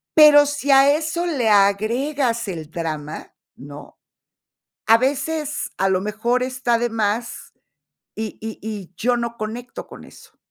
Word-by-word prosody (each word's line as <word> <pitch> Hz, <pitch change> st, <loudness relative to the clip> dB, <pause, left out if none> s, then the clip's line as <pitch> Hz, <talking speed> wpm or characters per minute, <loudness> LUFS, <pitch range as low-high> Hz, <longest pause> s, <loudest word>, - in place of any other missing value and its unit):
Pero 300 Hz, -1 st, +8 dB
si 285 Hz, -1 st, -1 dB
a 275 Hz, +1 st, +6 dB
eso 320 Hz, +3 st, -2 dB
le 270 Hz, -10 st, 0 dB
agregas 230 Hz, +5 st, +1 dB
el 160 Hz, -5 st, -6 dB
drama, 155 Hz, -2 st, -6 dB, 0.2 s
¿no?, 145 Hz, +2 st, -12 dB, 0.9 s
a 225 Hz, -, +6 dB
veces, 295 Hz, +3 st, -2 dB
a 195 Hz, +1 st, +1 dB
lo 185 Hz, -1 st, +1 dB
mejor 225 Hz, +5 st, -1 dB
está 255 Hz, -2 st, 0 dB
de 240 Hz, +1 st, -1 dB
más, 225 Hz, +1 st, -3 dB, 0.6 s
y 220 Hz, -1 st, -5 dB
y 220 Hz, 0 st, -6 dB
y 205 Hz, -4 st, -7 dB
yo 245 Hz, +1 st, +1 dB
no 235 Hz, 0 st, -4 dB
conecto 230 Hz, +3 st, -6 dB
con -, -, -12 dB
eso. -, -, -17 dB
235 Hz, 145 wpm, -21 LUFS, 205-275 Hz, 0.9 s, Pero